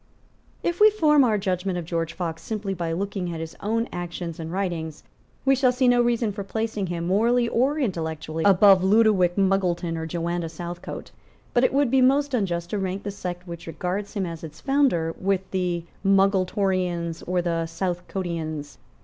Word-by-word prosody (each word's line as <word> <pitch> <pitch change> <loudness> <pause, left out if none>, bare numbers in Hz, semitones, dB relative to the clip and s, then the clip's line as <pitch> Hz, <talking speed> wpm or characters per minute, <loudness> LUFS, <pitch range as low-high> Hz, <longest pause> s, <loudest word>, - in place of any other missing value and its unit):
If 345 0 -1
we 430 - +9
form 305 -9 +4
our 220 -4 +3
judgment 185 -2 -1
of 175 - -4
George 165 0 -2
Fox 165 -2 -4
simply 205 +1 -3
by 170 -3 -3
looking 190 0 -3
at 165 - -5
his 165 0 -6
own 230 +3 -1
actions 175 -1 -5
and 160 0 -5
writings, 170 -5 -3 0.4
we 270 - +5
shall 260 -1 +3
see 250 +1 +1
no 245 0 +5
reason 235 -2 +1
for 200 0 -5
placing 215 0 -2
him, 170 -1 -3
morally 235 +6 +2
or 265 +6 +1
intellectually, 160 - -2
above 195 -1 +6
Ludowick 195 -3 +4
Muggleton 185 -3 +1
or 160 0 -4
Joanna 170 +1 -2
Southcote. 175 +1 -7 0.4
But 240 - +3
it - - +2
would 275 -2 +2
be 265 -1 +4
most 275 +2 +3
unjust 175 -7 -1
to 210 - -1
rank 190 +1 -3
the 205 - -3
sect 180 -2 -6
which 170 -1 -8
regards 180 +5 -3
him 195 -2 0
as 165 -2 -7
its 155 -1 -9
founder 270 - +1
with 190 0 -1
the 180 -2 -1 0.2
Muggletonians 185 -3 +1
or 180 0 0
the 165 -1 -1
Southcotians. 165 -4 -4
185 Hz, 175 wpm, -24 LUFS, 170-215 Hz, 0.4 s, we